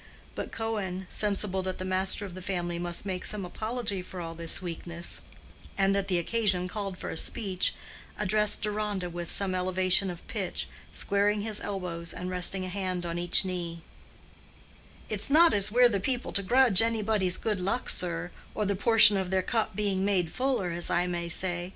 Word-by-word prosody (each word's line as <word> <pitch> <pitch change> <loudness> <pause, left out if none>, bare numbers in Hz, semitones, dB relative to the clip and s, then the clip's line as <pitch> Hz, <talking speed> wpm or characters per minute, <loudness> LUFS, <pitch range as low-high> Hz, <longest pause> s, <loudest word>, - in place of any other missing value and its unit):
But - - -6
Cohen, 200 -5 -4
sensible 200 -2 0
that 185 0 -4
the 185 - -6
master 190 +2 0
of 190 - -9
the 185 - -9
family 175 -2 -3
must 175 +2 -3
make 185 -2 -4
some 205 -3 -4
apology 215 +1 -3
for 185 0 -10
all 165 -1 -6
this 165 0 +3
weakness, 170 -1 -5 0.6
and 195 0 +2
that 200 0 -1
the 185 -2 0
occasion 190 -1 0
called 195 -1 -5
for - - -6
a - - -6
speech, 190 -3 +1 0.4
addressed 210 +1 +1
Deronda 205 -4 -3
with 175 0 -6
some 195 -2 +1
elevation 185 +1 +3
of 175 -1 -9
pitch, - - -4 0.2
squaring 205 +1 0
his 215 0 -1
elbows 180 -4 -5
and 180 0 -5
resting 185 +1 +4
a - - -6
hand 185 -2 -3
on 170 0 -4
each 175 +2 +6
knee: 170 -2 -5 1.3
"It's 210 +2 -1
not 325 +3 +6
as 205 0 +4
we're 245 +2 +6
the 205 -4 -1
people 245 +5 -2
to 200 - 0
grudge 235 0 +5
anybody's 215 -5 0
good 210 -3 -2
luck, 195 +7 -2
sir, 175 0 0 0.2
or 210 - -1
the 200 0 0
portion 210 0 +7
of 190 -2 -2
their 190 0 0
cup 220 0 -2
being 200 -2 -1
made 185 -5 0
fuller, 255 -9 -1
as 170 +1 -3
I 175 +1 +1
may 175 -1 -4
say. 175 +1 -2
190 Hz, 185 wpm, -28 LUFS, 180-210 Hz, 1.3 s, portion